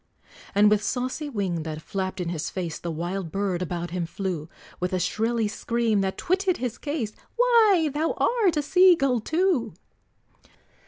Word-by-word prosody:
And 210 +1 +6
with 210 -1 +3
saucy 255 +6 -2
wing 195 - -2
that 155 -1 -5
flapped 185 +3 -4
in 175 -2 -2
his 165 -3 -3
face, 170 -5 -4
The 170 - -5
wild 170 +2 -3
bird 195 -2 -1
about 175 -1 -3
him 175 -2 -2
flew, 175 -3 -4 0.3
With 180 +1 -2
a 185 - +1
shrilly 225 +4 0
scream, 225 -1 0
that 190 0 -2
twitted 370 0 +1
his 245 -2 -4
case, 285 -8 -3 0.2
"Why, 440 -10 +4
thou 310 +2 0
art 420 -10 +2
a 295 - +1
sea 365 +3 +6
gull 275 -6 +1
too!" 315 - 0
215 Hz, 165 wpm, -25 LUFS, 180-300 Hz, 0.3 s, And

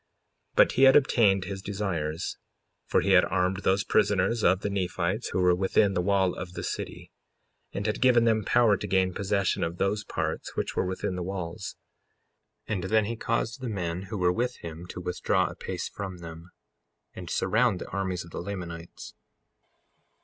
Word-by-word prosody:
55:20 - - -39
But - - +6
he - - 0
had 135 0 +8
obtained 105 -9 +4
his 95 0 -5
desires; 90 -5 -3 0.5
for - - +3
he 100 - +1
had 90 -1 +7
armed 90 +1 0
those 95 +1 +1
prisoners 100 +2 +2
of 95 +2 +4
the 100 - -1
Nephites 95 +2 -1
who - - -1
were 90 -1 +5
within 95 +2 +2
the 90 - +1
wall 95 -1 +2
of 90 0 -7
the - - -5
city, - - -5 0.6
and 100 - -4
had 105 -1 -1
given 125 -2 +5
them 110 -2 +2
power 115 0 +4
to 105 - -5
gain 95 -1 +2
possession 100 0 0
of 85 +1 -3
those 100 +3 0
parts - - -4
which - - -2
were 95 - 0
within 95 0 -3
the 90 - -3
walls. 90 -2 -5 0.9
55:21 - - -2
And 95 -4 -2
then 110 +2 +3
he 115 +3 -3
caused 115 +2 -2
the 125 - -3
men 90 -4 -3
who 110 - -3
were 90 -1 +2
with 125 +4 -1
him 85 +1 -7
to 90 - -7
withdraw 90 0 0
a - - -11
pace - - -4
from 95 -3 -6
them, 85 0 -10 0.6
and - - -8
surround 115 -2 +2
the - - -7
armies 95 -3 -2
of 85 - -14
the - - -5
Lamanites. 85 -3 -7
95 Hz, 190 wpm, -27 LUFS, 90-105 Hz, 0.9 s, had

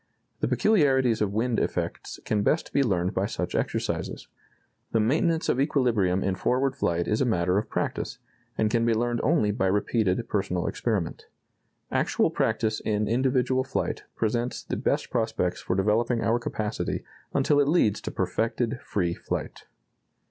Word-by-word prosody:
The - - 0
peculiarities 135 - +3
of 105 -2 +1
wind 115 +3 0
effects - - -3
can 105 -1 +1
best 155 +10 0
be 140 - +3
learned 95 -7 +1
by 95 +2 0
such - - -3
exercises.... - - -2 0.7
The 115 - +3
maintenance 160 +8 +2
of 130 - +2
equilibrium 115 - +2
in 95 - +1
forward 130 +7 0
flight 85 -9 0
is 105 +3 +1
a - - +5
matter 90 -4 +2
of - - -6
practice, - - -2 0.4
and 110 -1 +1
can 115 0 +2
be 115 -1 +3
learned 120 +1 0
only 140 -9 +2
by 95 -2 0
repeated 105 +2 +1
personal 95 -4 -1
experiment.... 100 -8 -2 0.6
Actual - - +1
practice 110 -1 0
in 105 -1 -1
individual 130 +2 +2
flight 135 - -3
presents 120 +2 -1
the - - -3
best - - -1
prospects 110 -6 -1
for 90 - -1
developing 115 +4 +1
our 115 +2 +2
capacity 110 -3 -3 0.3
until 145 +1 +3
it 140 - +3
leads 145 - +2
to - - -4
perfected 115 +2 -1
free 85 -4 -1
flight." - - -5
115 Hz, 155 wpm, -26 LUFS, 100-130 Hz, 0.7 s, a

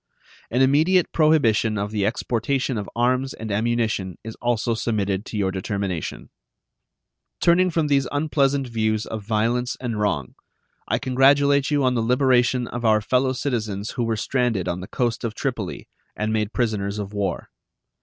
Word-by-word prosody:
An 125 +3 +2
immediate 160 +7 +3
prohibition 115 -9 +3
of 100 +1 -2
the 105 -2 0
exportation 125 +3 -1
of 100 - -6
arms 130 +3 +1
and 110 -1 -6
ammunition 110 -4 -1
is 110 0 -6
also 120 -1 0
submitted 100 -3 -1
to 110 - -5
your 95 -2 +1
determination. 95 -3 -4 1.1
Turning 180 +2 +4
from 165 -2 0
these 140 -3 +2
unpleasant 145 -2 +1
views 110 -2 -1
of 110 -1 -5
violence 115 +4 0
and 115 -4 -3
wrong, 75 -11 -1 0.5
I - - +1
congratulate 140 +2 +3
you 145 -2 +1
on 130 -1 +3
the 120 - 0
liberation 125 0 +2
of 120 0 -5
our 110 -1 +4
fellow 130 +4 +1
citizens 110 -7 -3
who 125 - -2
were 115 -1 -1
stranded 120 -5 0
on 85 +1 -2
the 95 - -7
coast 120 -3 -1
of 115 -2 -3
Tripoli 120 -10 -4 0.3
and 110 +1 -1
made 110 -1 0
prisoners 105 -5 -1
of 105 0 -5
war. 100 -4 -3
115 Hz, 160 wpm, -23 LUFS, 105-130 Hz, 1.1 s, Turning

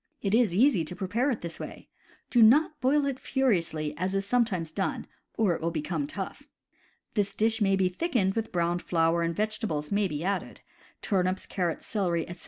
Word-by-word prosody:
It 200 -1 0
is 225 -6 +3
easy 225 - +4
to 180 - -7
prepare 215 +10 0
it 240 - -2
this 170 -1 -6
way. - - -8 0.4
Do 240 - +4
not 295 +6 +5
boil 280 +3 +3
it 275 -2 -2
furiously 170 - 0
as 185 +2 -1
is 195 0 0
sometimes 200 -8 0
done, 190 +4 -2 0.3
or 210 -6 +3
it 160 - -5
will 165 - 0
become 165 - -2
tough. 310 - -6 0.7
This 205 -2 -1
dish 225 +1 +1
may 195 -1 +3
be 190 -1 +2
thickened 195 - 0
with 225 +1 -3
browned 175 0 0
flour, 165 0 +1
and 170 0 -1
vegetables 210 -8 -2
may 200 0 +2
be 150 -2 -4
added 195 +1 -3 0.2
— - - -29
turnips, 185 -1 0
carrots, 175 -4 -2
celery, 175 -6 -1
etc. 175 0 -9
195 Hz, 190 wpm, -28 LUFS, 170-225 Hz, 0.7 s, not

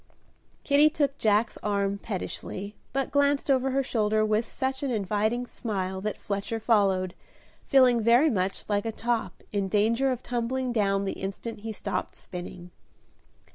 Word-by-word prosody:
Kitty 290 +1 +5
took 285 -2 -1
Jack's 215 +1 +2
arm 200 -1 0
pettishly, 200 0 -5 0.2
but 270 0 -1
glanced 285 0 +2
over 265 0 +2
her 270 +1 +1
shoulder 215 -3 +1
with 215 +2 +1
such 265 0 -2
an 280 - -1
inviting 215 +2 0
smile 190 -6 -3
that 215 +1 -3
Fletcher 205 +3 -3
followed, 195 -5 +2 0.5
feeling 255 -3 +5
very 240 +7 +5
much 190 -3 -1
like 205 +1 0
a - - -1
top, 235 +1 -2
in 200 -2 0
danger 230 +7 +2
of 255 -1 -4
tumbling 250 +1 -1
down 200 -3 +1
the 195 - -1
instant 200 +4 -5
he 220 +1 -5
stopped 215 - -3
spinning. 180 0 -8
220 Hz, 150 wpm, -27 LUFS, 200-255 Hz, 0.5 s, Kitty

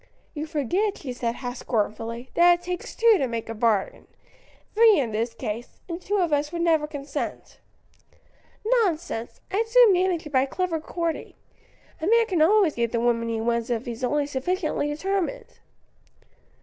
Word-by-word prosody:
"You 305 0 -4
forget," 345 - 0
she 260 -4 -6
said, 235 -1 -2
half 245 0 -5
scornfully, 230 +2 -3
"that 350 0 +6
it - - -23
takes 360 0 -5
two 455 -4 +5
to 270 - +1
make 230 -1 -4
a - - -3
bargain; 220 -3 0 0.7
three 445 -2 +6
in 250 -6 0
this 230 +2 -2
case; 225 +2 -6
and 340 0 -5
two 410 +3 -1
of 345 -5 +1
us 290 +1 0
would 340 -1 -2
never 320 -3 +2
consent." 285 -1 -6 1.1
"Nonsense! 350 - 0
I'd 440 +4 0
soon 470 -3 +6
manage 360 -2 +1
it 300 - -8
by 260 +1 +3
clever 360 +2 -2
courting. 335 +1 -4 0.7
A 320 - -1
man 460 +2 +5
can 365 -7 0
always 365 -1 +4
get 235 -1 -1
the 235 - 0
woman 230 -1 +1
he 225 -1 -1
wants 235 +1 -1
if 235 -1 -1
he's 235 +1 -6
only 290 +3 +1
sufficiently 295 +3 -1
determined." 390 +9 -3
300 Hz, 170 wpm, -25 LUFS, 240-365 Hz, 1.1 s, that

